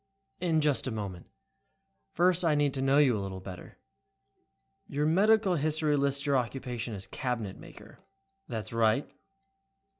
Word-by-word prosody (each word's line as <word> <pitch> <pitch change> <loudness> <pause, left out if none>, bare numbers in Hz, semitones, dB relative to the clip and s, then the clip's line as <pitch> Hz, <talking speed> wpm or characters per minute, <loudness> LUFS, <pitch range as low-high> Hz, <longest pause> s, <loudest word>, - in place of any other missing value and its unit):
"In 165 -3 +1
just 145 -3 +1
a - - -2
moment. 100 -5 -6 0.9
First 180 +1 +3
I 160 -3 +3
need 145 -2 +2
to 135 - -2
know 135 +1 +3
you 140 -5 +5
a 105 - -2
little 95 -1 -5
better. 95 -1 -10 1.1
Your 145 +1 -1
medical 195 +3 +4
history 155 0 +1
lists 140 0 0
your 140 -2 +3
occupation 120 -2 -3
as 95 - -6
'cabinet 115 -6 -4
maker'." - - -14 0.5
"That's 110 -3 -5
right." 115 +3 +2
135 Hz, 145 wpm, -29 LUFS, 110-155 Hz, 1.1 s, you